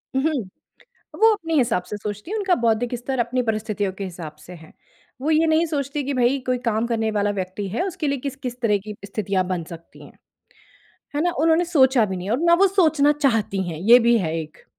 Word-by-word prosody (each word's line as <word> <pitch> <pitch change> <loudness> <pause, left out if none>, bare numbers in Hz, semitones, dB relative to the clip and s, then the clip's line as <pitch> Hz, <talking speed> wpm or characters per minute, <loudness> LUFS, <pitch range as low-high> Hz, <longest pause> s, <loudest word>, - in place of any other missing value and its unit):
उ, - - +3
हुँ। 270 -9 -1 0.7
वो 445 0 +7
अपने 330 -6 -4
हिसाब 235 -9 +2
से 210 - -7
सोचती 210 - -6
हैं, 435 - -1
उनका 380 -3 +2
बौद्धिक 230 +2 +1
स्तर 255 +2 -4
अपनी 245 +2 0
परिस्थितियों 215 -3 -2
के 195 +1 -6
हिसाब 170 -4 -8
से 180 - -10
है। 160 -2 -14 0.5
वो 300 +4 -1
ये 320 +1 +3
नहीं 315 +1 +3
सोचतीं 285 -2 -3
कि 285 - -1
भई 255 +2 +2
कोई 250 -1 +1
काम 220 +1 0
करने 225 -2 -1
वाला 205 -1 0
व्यक्ति 190 +2 -4
है, 225 - -2
उसके 360 -5 -4
लिए 280 -1 -1
किस-किस 255 -2 -6
तरह 210 -4 +2
की 210 -1 -7
स्थितियाँ 200 -2 -1
बन 180 -3 -3
सकती 165 0 -12
हैं। - - -15 1.0
है 295 - +1
ना, 350 - +2
उन्होंने 325 +2 +3
सोचा 265 -7 +4
भी 190 - -4
नहीं 180 +3 -5
और 240 - +1
ना 340 0 +5
वो - - +7
सोचना 315 -6 +3
चाहती 225 -9 0
हैं, 155 - -6
ये 230 +7 +7
भी 235 0 +3
है 160 -4 -2
एक। 155 0 -11
240 Hz, 220 wpm, -22 LUFS, 200-295 Hz, 1.0 s, वो